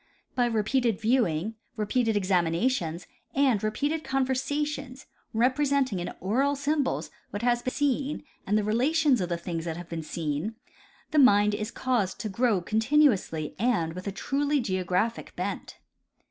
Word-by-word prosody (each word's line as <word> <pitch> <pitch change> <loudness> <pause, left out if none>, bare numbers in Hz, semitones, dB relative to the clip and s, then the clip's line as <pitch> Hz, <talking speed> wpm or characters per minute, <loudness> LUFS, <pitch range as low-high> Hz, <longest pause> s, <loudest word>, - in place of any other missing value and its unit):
By 245 -1 +2
repeated 230 0 +1
viewing, 220 -4 +1 0.2
repeated 220 +1 +1
examinations 175 -1 0 0.3
and 265 -7 +3
re 215 - +2
peated 295 +8 -1
conversations, 270 +1 -2 0.3
representing 260 -1 +2
in 175 - -4
oral 265 +9 +1
symbols 285 0 -1 0.2
what 205 +3 -5
has 240 0 +2
been 255 - -2
seen 285 +1 -1 0.2
and 210 +2 +3
the 215 - +1
relations 260 +4 +2
of 180 - -2
the 170 - -1
things 170 -1 -4
that 165 -1 -3
have 175 -1 -9
been 165 -1 -4
seen, 155 +6 -3 0.6
the 310 - +3
mind 210 -6 +6
is 210 +1 -2
caused 235 -7 -1
to 215 - -3
grow 215 -2 +2
continuouily 220 - +2
and 205 -9 +1
with 185 +3 -7
a - - -1
truly 285 +8 0
geo 185 -6 -1
graphic 185 +6 -1
bent. - - -4
225 Hz, 150 wpm, -27 LUFS, 185-265 Hz, 0.6 s, mind